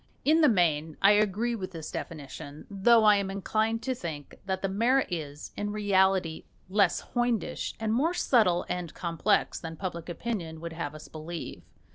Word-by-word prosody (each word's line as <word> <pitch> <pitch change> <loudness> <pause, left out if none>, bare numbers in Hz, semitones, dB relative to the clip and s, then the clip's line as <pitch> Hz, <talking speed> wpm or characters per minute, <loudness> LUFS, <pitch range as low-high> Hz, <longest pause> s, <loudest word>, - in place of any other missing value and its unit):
In 315 +3 +5
the 300 - +6
main 160 -6 +1
I 195 - +6
agree 210 +3 +2
with 190 -5 -5
this 160 -2 -6
definition; 145 -1 -7
though 220 +3 +5
I 210 -1 +7
am 200 -1 -1
inclined 220 +3 -1
to 260 - 0
think 160 - -7
that 190 0 -2
the - - +2
mara 235 +8 +2
is, 150 -4 -5
in 205 0 -3
reality, 190 -5 +2 0.2
less 200 +1 +3
hoydenish 240 -3 -1
and 220 -1 0
more 315 +9 +1
subtle 210 - +3
and 175 -3 -4
complex 175 +4 0
than 165 -1 -7
public 175 -2 -5
opinion 170 -4 -4
would 165 0 -6
have 160 -3 -4
us 155 - -10
believe. 160 +2 -7
190 Hz, 170 wpm, -28 LUFS, 165-220 Hz, 0.2 s, I